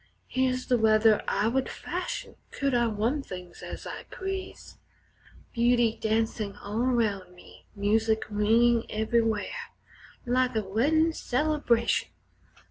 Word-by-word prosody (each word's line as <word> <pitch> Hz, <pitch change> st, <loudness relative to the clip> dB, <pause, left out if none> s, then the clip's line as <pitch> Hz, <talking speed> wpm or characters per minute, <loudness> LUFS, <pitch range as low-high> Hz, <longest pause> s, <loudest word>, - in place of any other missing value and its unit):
Here's 255 Hz, 0 st, 0 dB
the 245 Hz, -2 st, +2 dB
weather 215 Hz, 0 st, +4 dB
I 210 Hz, -, +1 dB
would 260 Hz, +3 st, 0 dB
fashion -, -, -5 dB
could 275 Hz, -1 st, -1 dB
I 240 Hz, -1 st, +3 dB
run 225 Hz, +7 st, 0 dB
things 180 Hz, -7 st, -9 dB
as -, -, -7 dB
I -, -, -7 dB
please 380 Hz, 0 st, -6 dB, 0.7 s
Beauty 235 Hz, -1 st, +3 dB
dancin' 220 Hz, -2 st, -1 dB
all 210 Hz, +3 st, -3 dB
around 220 Hz, -7 st, 0 dB
me, 180 Hz, -, -17 dB
music 220 Hz, +2 st, +1 dB
ringin' 225 Hz, +3 st, +3 dB
everywhere, 220 Hz, -1 st, -1 dB, 0.5 s
Like 255 Hz, 0 st, +1 dB
a 220 Hz, -, +1 dB
weddin' 300 Hz, +12 st, +2 dB
celebration. 265 Hz, -5 st, +1 dB
230 Hz, 120 wpm, -28 LUFS, 215-255 Hz, 0.7 s, weather